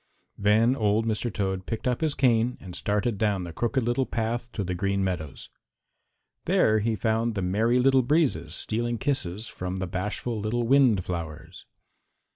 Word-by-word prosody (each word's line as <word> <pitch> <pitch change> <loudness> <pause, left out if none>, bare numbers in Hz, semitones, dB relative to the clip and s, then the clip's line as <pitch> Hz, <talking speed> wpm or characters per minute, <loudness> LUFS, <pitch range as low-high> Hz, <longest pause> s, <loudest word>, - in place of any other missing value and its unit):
Then 110 +5 +4
old 110 -1 +1
Mr. 115 +1 -1
Toad 95 -2 -2
picked 115 +2 -3
up 125 +2 0
his 155 -3 +1
cane 120 -1 +2
and 90 -2 -9
started 105 +1 -1
down 100 -4 +1
the 85 -2 -7
Crooked 120 - 0
Little 120 +3 0
Path 120 +1 -2
to 100 - -2
the 90 -1 -3
Green 100 +2 0
Meadows. 85 -7 -4 0.9
There 110 0 +3
he 110 +1 0
found 110 +2 0
the 100 - -1
Merry 110 +7 +2
Little 130 +1 +4
Breezes 145 +3 +1
stealing 120 +2 -1
kisses 110 -7 -2
from 90 -4 -5
the 95 - -2
bashful 105 +5 -3
little 110 +3 -1
wind 120 -6 +4
flowers. 80 -4 -6
110 Hz, 165 wpm, -26 LUFS, 95-120 Hz, 0.9 s, Then